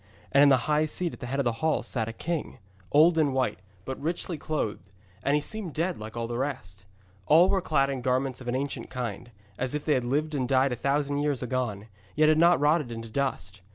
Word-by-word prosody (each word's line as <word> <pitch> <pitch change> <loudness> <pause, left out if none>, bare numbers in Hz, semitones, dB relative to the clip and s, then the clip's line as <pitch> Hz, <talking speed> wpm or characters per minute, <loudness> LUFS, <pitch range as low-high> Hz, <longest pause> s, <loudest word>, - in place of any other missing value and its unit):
And 140 - +5
in 145 - +7
the 130 -3 +3
high 150 0 +2
seat 170 +2 -2
at - - -10
the 125 - -6
head 135 +3 -2
of - - +2
the 120 - +2
hall 160 -1 +1
sat 110 -4 -3
a - - -3
king, 160 +6 -4 0.3
old 160 +3 +5
and 145 -4 +2
white, 130 -2 0 0.3
but 130 0 -5
richly 170 +3 -2
clothed, 110 - -3 0.3
and 140 +6 +2
he 150 - +2
seemed 195 -1 -4
dead 170 -1 -1
like 110 +2 -8
all 115 - -2
the 120 +1 -4
rest. 100 -9 -5 0.4
All 170 +5 +6
were 195 - +2
clad 140 -5 +1
in 135 -2 -4
garments 130 +1 -1
of 125 - -9
an 120 - -1
ancient 140 +1 -3
kind, 120 -3 -5 0.3
as 130 +3 0
if 150 - -4
they 155 - +3
had 130 -3 +1
lived 150 +5 0
and 130 -3 -1
died 135 0 +3
a - - -1
thousand 140 +3 0
years 145 -4 0
agone, 120 -5 -2 0.3
yet 155 0 +4
had 155 0 +4
not 170 +1 +5
rotted 150 -3 +2
into 115 0 -7
dust. 110 -8 -3
140 Hz, 235 wpm, -27 LUFS, 125-155 Hz, 0.4 s, in